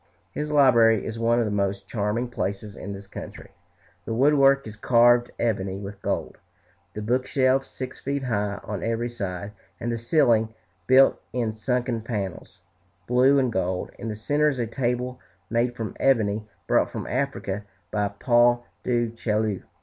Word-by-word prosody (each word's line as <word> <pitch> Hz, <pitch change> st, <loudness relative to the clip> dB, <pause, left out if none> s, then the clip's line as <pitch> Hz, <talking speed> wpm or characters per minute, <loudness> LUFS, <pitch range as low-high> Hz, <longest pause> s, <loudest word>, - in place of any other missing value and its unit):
His 150 Hz, 0 st, -4 dB
library 120 Hz, -7 st, +5 dB
is 115 Hz, 0 st, -5 dB
one 115 Hz, +1 st, +2 dB
of 120 Hz, -, +2 dB
the 105 Hz, -, -2 dB
most 100 Hz, -1 st, -1 dB
charming 110 Hz, +3 st, -1 dB
places 100 Hz, -3 st, -4 dB
in 100 Hz, -, -7 dB
this 100 Hz, 0 st, -8 dB
country. 100 Hz, -, -9 dB, 0.5 s
The 115 Hz, -, -3 dB
wood 140 Hz, +5 st, +4 dB
work 135 Hz, -1 st, +4 dB
is 110 Hz, -1 st, -8 dB
carved 120 Hz, +2 st, +4 dB
ebony 95 Hz, -5 st, -1 dB
with 100 Hz, 0 st, -8 dB
gold, -, -, -3 dB, 0.6 s
the 105 Hz, -, -4 dB
bookshelves 130 Hz, +3 st, +1 dB
six 130 Hz, -1 st, -7 dB
feet 140 Hz, 0 st, -2 dB
high 105 Hz, -4 st, -1 dB
on 105 Hz, -2 st, -5 dB
every 115 Hz, +1 st, -1 dB
side, 100 Hz, -4 st, -5 dB, 0.3 s
and 120 Hz, -, -2 dB
the 115 Hz, -, -2 dB
ceiling 115 Hz, -4 st, +2 dB, 0.3 s
built 130 Hz, +1 st, +5 dB
in 115 Hz, -3 st, -1 dB
sunken 120 Hz, +1 st, -1 dB
panels, 105 Hz, -5 st, -5 dB, 0.4 s
blue 130 Hz, +3 st, +4 dB
and 130 Hz, -4 st, +1 dB
gold. 90 Hz, -1 st, -1 dB
In -, -, -5 dB
the 110 Hz, -, -3 dB
centre 145 Hz, +7 st, +2 dB
is 135 Hz, -, -3 dB
a 120 Hz, -, 0 dB
table 125 Hz, +1 st, -2 dB, 0.3 s
made 120 Hz, +1 st, +1 dB
from 115 Hz, -3 st, -5 dB
ebony, 110 Hz, -5 st, +2 dB, 0.2 s
brought -, -, +2 dB
from -, -, -5 dB
Africa 120 Hz, -6 st, -2 dB, 0.3 s
by 105 Hz, -1 st, +1 dB
Paul 120 Hz, +3 st, +3 dB, 0.2 s
du 120 Hz, -2 st, 0 dB
Chaillu. 110 Hz, -3 st, -1 dB
115 Hz, 165 wpm, -25 LUFS, 105-125 Hz, 0.6 s, library